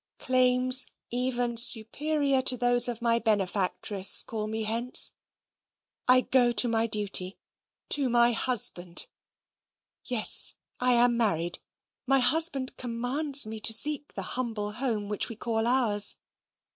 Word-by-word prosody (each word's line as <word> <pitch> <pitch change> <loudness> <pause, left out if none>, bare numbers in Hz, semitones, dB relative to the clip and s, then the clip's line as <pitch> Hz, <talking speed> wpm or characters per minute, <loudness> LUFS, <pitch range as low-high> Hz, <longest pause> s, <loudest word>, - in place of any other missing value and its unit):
Claims 255 0 +2 0.2
even 245 -1 -3
superior 275 +5 +2
to 255 -1 +3
those 245 0 +3
of 240 -1 -7
my 235 0 0
benefactress 200 -2 +1
call 215 -2 -7
me 220 +1 -4
hence. 230 +3 +1 1.0
I 255 0 +5
go 250 -2 +1
to 245 - +3
my 230 0 -1
duty 200 -3 -1 0.5
to 280 -3 +2
my 240 0 +2
HUSBAND. 195 -8 +1 1.0
Yes, 245 -4 -2 0.2
I 250 0 +1
am 240 0 +2
married. 175 -7 -2 0.5
My 270 +1 +2
husband 270 0 +2
COMMANDS 255 +4 0
me 220 0 -8
to 225 - +2
seek 295 +5 +1
the - - -5
HUMBLE 225 -5 -5
HOME 220 -3 -4
which 210 +3 +1
we 230 - -9
call 225 0 -4
ours. 225 -5 +1
240 Hz, 130 wpm, -25 LUFS, 220-255 Hz, 1.0 s, I